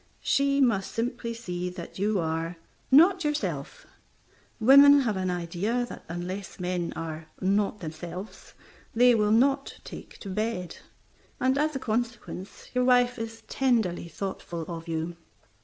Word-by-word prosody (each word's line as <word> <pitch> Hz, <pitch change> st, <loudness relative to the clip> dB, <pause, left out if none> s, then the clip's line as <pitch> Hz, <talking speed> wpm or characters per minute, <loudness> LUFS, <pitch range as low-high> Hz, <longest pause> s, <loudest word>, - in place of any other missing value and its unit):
She 280 Hz, 0 st, +2 dB
must 215 Hz, -7 st, +2 dB
simply 235 Hz, 0 st, -3 dB
see 180 Hz, -6 st, -4 dB
that 180 Hz, 0 st, -9 dB
you 205 Hz, +1 st, +1 dB
are 165 Hz, +1 st, -2 dB, 0.3 s
"not 350 Hz, +7 st, +6 dB
yourself." 300 Hz, +11 st, -3 dB, 0.7 s
Women 280 Hz, +4 st, +8 dB
have 225 Hz, -6 st, 0 dB
an 185 Hz, -1 st, -1 dB
idea 180 Hz, +8 st, -1 dB
that -, -, -9 dB
unless 180 Hz, +4 st, -5 dB
men 180 Hz, -1 st, -2 dB
are 160 Hz, -1 st, -6 dB
"not 200 Hz, +2 st, +1 dB
themselves" 170 Hz, +5 st, -8 dB, 0.4 s
they 245 Hz, +1 st, +6 dB
will 210 Hz, -2 st, +2 dB
not 270 Hz, +5 st, +2 dB
take -, -, -10 dB
to 200 Hz, -, -7 dB
bed, 210 Hz, -3 st, -3 dB, 0.6 s
and 260 Hz, +1 st, +2 dB
as 300 Hz, +1 st, 0 dB
a -, -, -1 dB
consequence 230 Hz, -5 st, -4 dB
your 250 Hz, 0 st, +2 dB
wife 245 Hz, -1 st, +4 dB
is 225 Hz, 0 st, -6 dB
tenderly 225 Hz, -11 st, +1 dB
thoughtful 170 Hz, -2 st, -5 dB
of 165 Hz, -1 st, -7 dB
you. 165 Hz, +1 st, -3 dB
210 Hz, 140 wpm, -27 LUFS, 175-250 Hz, 0.7 s, Women